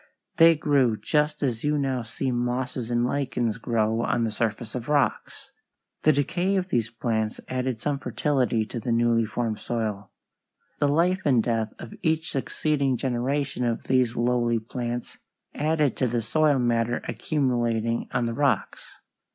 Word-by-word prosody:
They 165 0 +7
grew 140 -7 +2
just 150 +3 0
as 120 -5 -1
you 150 0 +1
now 135 -3 0
see 120 +4 -3
mosses 125 0 -2
and 120 0 +1
lichens 125 -4 -1
grow 115 -1 0
on 120 - 0
the 115 - 0
surface 110 +1 -2
of 125 +1 -5
rocks. 145 -2 0 0.5
The 155 - +5
decay 175 +7 0
of 185 -1 -1
these 115 - 0
plants 110 -2 -2
added 130 -2 -2
some 140 +3 -1
fertility 125 -2 0
to 120 - -5
the 120 +2 -3
newly 115 0 +3
formed 110 -1 -2
soil. 110 -4 -3 0.7
The 145 - +3
life 175 +6 +2
and 125 -6 +3
death 115 -2 -1
of 115 - -9
each 160 0 0
succeeding 140 -1 0
generation 130 +2 -1
of 120 -1 -1
these 125 -3 +2
lowly 120 0 +2
plants 120 +1 -5 0.3
added 150 -2 +1
to 130 - +1
the 120 -1 -1
soil 150 +4 +3
matter 120 -1 0
accumulating 120 -6 0
on 125 -1 0
the 115 - -2
rocks. 140 +1 -1
125 Hz, 155 wpm, -25 LUFS, 115-140 Hz, 0.7 s, They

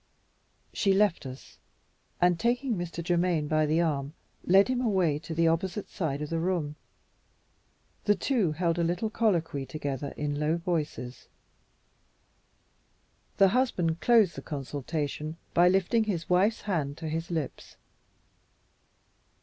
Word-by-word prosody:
She 195 -2 +2
left 195 -8 +2
us, 130 +1 -11 0.6
and, 175 -1 +3
taking 245 +1 +1
Mr. 175 -1 -4
Germaine 175 -3 +1
by 155 0 +2
the 160 +3 +2
arm, 145 -2 -1 0.3
led 195 +3 +5
him 255 -1 0
away 185 - +1
to 160 +1 -7
the 165 0 +3
opposite 185 +5 -1
side 150 -4 -2
of 150 - -6
the 165 - 0
room. 165 -4 -1 1.3
The 205 - +4
two 205 - +1
held 170 +1 0
a - - +2
little 175 +6 -1
colloquy 170 -11 0
together 140 -1 -4
in 145 -1 -2
low 155 +2 +1
voices. 155 -8 -3 2.1
The 195 -1 +6
husband 185 -9 +1
closed 225 -7 +4
the - - -6
consultation 150 +2 -4 0.2
by 175 +1 +5
lifting 195 +5 +2
the 180 -6 -2
wife's 190 +5 +2
hand 155 -8 -2
to 160 - -5
his 165 +2 -3
lips. 160 -5 -5
170 Hz, 135 wpm, -28 LUFS, 150-190 Hz, 2.1 s, The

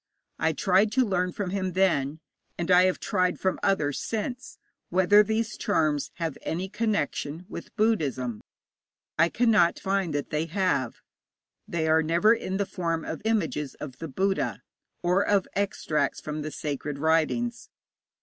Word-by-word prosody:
I 160 - +2
tried 195 +6 +3
to 260 -1 +3
learn 180 -3 0
from 185 -1 -4
him 185 -2 -2
then, 160 -5 +1 0.4
and 175 +1 -1
I 180 0 +7
have 185 - +1
tried 180 -1 0
from 190 - 0
others 150 -8 +1
since, 245 +4 -4 0.3
whether 190 +3 +5
these 220 +1 -1
charms 155 -7 0
have 165 -4 -4
any 180 +4 -3
connection 190 -6 -2
with - - -9
Buddhism. 140 - 0 0.8
I 165 - +5
cannot 220 -7 +3
find 195 -3 0
that 145 - -3
they 155 +2 -1
have. 165 - -1 0.7
They 160 -2 -1
are 160 0 +4
never 170 +7 +4
in 190 -4 -3
the 200 - 0
form 165 -4 -2
of 160 - -5
images 160 - -1
of 130 -4 -9
the 165 - -5
Buddha, 190 +7 -1 0.4
or 180 +2 +3
of 200 -2 +2
extracts 155 -7 0
from 150 0 -5
the 155 - -4
sacred 145 -1 -4
writings. 165 +11 0
180 Hz, 150 wpm, -27 LUFS, 155-200 Hz, 0.8 s, I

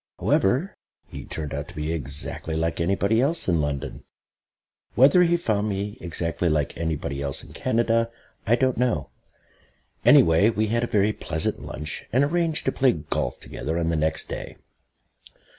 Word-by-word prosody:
However, 130 - +1 0.3
he - - -9
turned 75 -3 -5
out 70 +1 -4
to - - -12
be 75 +2 -2
exactly 75 +2 -4
like 80 +1 -1
anybody 100 +6 +2
else 160 +5 +1
in 85 -4 +2
London. 70 -2 -4 0.9
Whether 140 +8 +6
he 175 0 +4
found 110 -9 0
me 100 +1 -4
exactly 85 0 -1
like 75 -2 0
anybody 75 -4 -3
else 70 -1 -1
in - - -13
Canada 115 0 +1 0.4
I 115 - +5
don't 130 -1 +1
know. 125 -2 0 0.9
Anyway, 80 +6 +6
we 110 -1 0
had 115 +2 +1
a - - 0
very 105 0 +2
pleasant 80 -5 -2
lunch, 75 +3 -6
and 130 +4 +3
arranged 165 +1 0
to 130 - +2
play 130 -2 +3
golf 75 - -3
together 80 +3 -4
on 85 -1 0
the 85 - 0
next 80 0 0
day. - - -6
95 Hz, 160 wpm, -24 LUFS, 80-120 Hz, 0.9 s, Whether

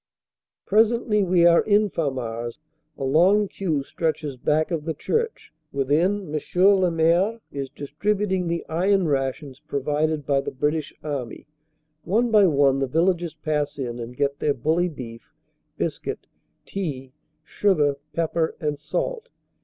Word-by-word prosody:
Presently 220 0 +3
we 175 -2 +3
are 170 -1 +6
in 210 0 +3
Famars. 120 -6 -3 0.4
A - - -5
long 180 +10 +4
queue 160 -8 -2
stretches 155 -1 -2
back 150 +6 0
of 160 -3 -2
the 160 -2 -2
church. 455 - -2 0.2
Within 155 +6 0
M. 155 - -1 0.2
le 190 -1 +5
Maire 170 +7 +2
is 140 -1 -4
distributing 185 +7 -1
the 170 0 -2
iron 185 +3 +2
rations 135 -1 -2
provided 150 +2 -1
by 140 -1 +2
the - - -4
British 150 +3 -1
Army. 140 -6 -5 0.6
One 230 +6 +1
by 210 -3 +6
one 140 -3 +3
the 135 - 0
vil 165 +8 +3
lagers 170 -2 -7
pass 150 -1 -1
in 120 -3 -4
and 120 +1 -7
get 140 0 0
their 145 - +1
bully 160 +8 +1
beef, 115 -7 -10 0.5
biscuit, - - -3 0.4
tea, 135 -9 -5 0.3
sugar, 150 -9 +1 0.2
pep 165 -1 -1
per 160 -1 0
and 150 -2 -2
salt. 480 - -3
155 Hz, 145 wpm, -24 LUFS, 140-190 Hz, 0.6 s, are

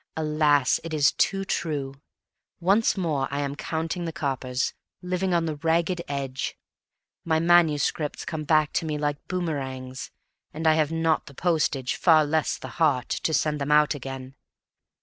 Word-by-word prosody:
Alas! 150 -3 +2
it 165 -1 -4
is 145 -2 +4
too 195 0 0
true. 145 -7 -2 0.7
Once 200 +5 +3
more 150 -7 0
I 140 +1 -2
am 140 0 -3
counting 165 +3 -3
the 165 - -3
coppers, 135 -5 -2 0.3
living 180 +1 -1
on 170 -1 +2
the 155 -2 -3
ragged 170 +3 +1
edge. 135 -2 -4 0.7
My 160 -1 +1
manuscripts 160 -3 +2
come 160 -1 -4
back 155 0 +2
to - - 0
me 150 -1 -2
like 145 -1 -3
boomerangs, 135 -7 -4 0.5
and 160 +1 -4
I 160 - +6
have 155 -1 +1
not 165 -1 +1
the 140 - -12
postage, 150 -7 0
far 160 -3 +4
less 155 +1 0
the - - -8
heart, 140 -6 +2
to - - -1
send 150 -1 0
them 140 +1 -1
out 150 0 +5
again. 135 -1 -7
155 Hz, 160 wpm, -25 LUFS, 140-165 Hz, 0.7 s, I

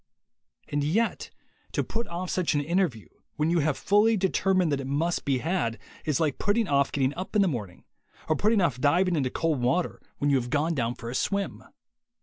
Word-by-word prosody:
And 145 0 -1
yet 210 +11 0 0.4
to - - +1
put 230 +1 -4
off 175 +1 -4
such 180 -4 0
an 145 - +2
interview, 160 - 0 0.3
when 155 +2 +1
you 175 - +3
have 150 -2 +1
fully 210 +2 +3
determined 185 -2 +2
that 140 - 0
it 130 - -6
must 160 +5 -1
be 135 -2 +2
had, 135 -6 -1 0.3
is 150 -2 +1
like 155 -4 0
putting 205 +2 +1
off 140 -1 +2
getting 135 -1 +1
up 185 +6 -6
in 205 - +5
the - - +2
morning, 105 - -5 0.4
or 155 - +2
putting 210 +5 +2
off 130 -8 0
diving 175 +5 +3
into 135 -4 0
cold 155 -1 -1
water 145 +9 0 0.2
when 145 -1 +1
you 140 - +4
have 120 -1 -3
gone 155 +4 +1
down 120 -4 -1
for 115 0 -7
a - - -5
swim. 200 +8 -2
155 Hz, 205 wpm, -27 LUFS, 140-185 Hz, 0.4 s, in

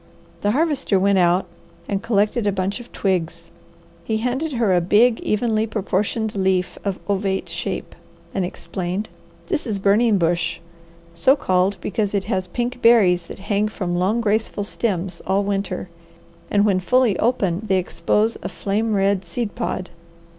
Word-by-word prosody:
The 205 - +1
Harvester 285 -5 +1
went 195 0 +3
out 175 +1 +3 0.4
and 200 -1 -1
collected 215 0 +1
a - - +3
bunch 190 +3 -2
of 240 - -12
twigs. 170 -3 -2 0.5
He 220 +5 -1
handed 260 +7 -2
her 230 -6 +2
a 175 - +3
big, 225 +7 +4
evenly 220 0 0
proportioned 215 +1 -1
leaf 190 -2 0
of 195 -2 -2
ovate 195 -1 -1
shape, - - -4 0.4
and 190 - 0
explained: 185 +2 -4 0.4
"This 325 -8 -2
is 210 -3 -1
burning 205 +3 +3
bush, 170 -1 0 0.5
so 215 +11 +4
called 185 -5 +1
because 205 0 -1
it 195 - +1
has 185 -1 -2
pink 245 +5 -3
berries 185 -7 +5
that - - -8
hang 205 +1 0
from 185 -4 -3
long, 195 +6 +1
graceful 215 -1 0
stems 190 -4 -2
all 195 +2 +2
winter, 195 -2 -2 0.6
and 205 0 +3
when 195 -3 +3
fully 250 +2 +3
open 205 -5 +1
they 190 -1 +3
expose 210 +4 0
a 180 - -4
flame 210 +4 -1
red 195 -1 +2
seed 205 +5 -4
pod. 185 -6 -3
200 Hz, 155 wpm, -21 LUFS, 185-225 Hz, 0.6 s, berries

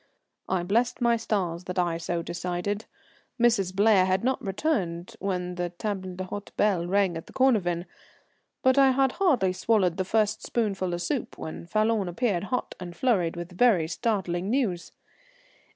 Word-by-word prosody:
I 185 -2 0
blessed 230 +7 +1
my 235 -1 +3
stars 185 -6 -2
that 180 +1 -5
I 170 -2 +1
so 170 0 -2
decided. 180 +5 -3 0.5
Mrs. 225 -6 +3
Blair 195 -1 +4
had 185 +2 +1
not 260 +1 0
returned 190 - -2
when 180 -2 -2
the 175 0 -2
table 185 0 -4
d'hôte 185 +2 -6
bell 185 -5 +2
rang 195 -2 +2
at 165 - -9
the - - -14
Cornavin, 190 -10 +2 0.8
but 260 +1 +4
I 270 -1 +6
had 270 0 +3
hardly 255 - +2
swallowed 185 -3 +1
the 190 - +1
first 210 +2 0
spoonful 195 -6 -1
of 175 - -4
soup 280 -5 -3
when 160 +1 -7
Falloon 215 0 +1
appeared, 195 0 -1
hot 250 +4 -2
and 175 -2 -7
flurried, 190 -11 +1
with 175 +1 -6
very 190 -7 +4
startling 185 -1 -1
news. 220 -9 -1
190 Hz, 160 wpm, -27 LUFS, 175-225 Hz, 0.8 s, I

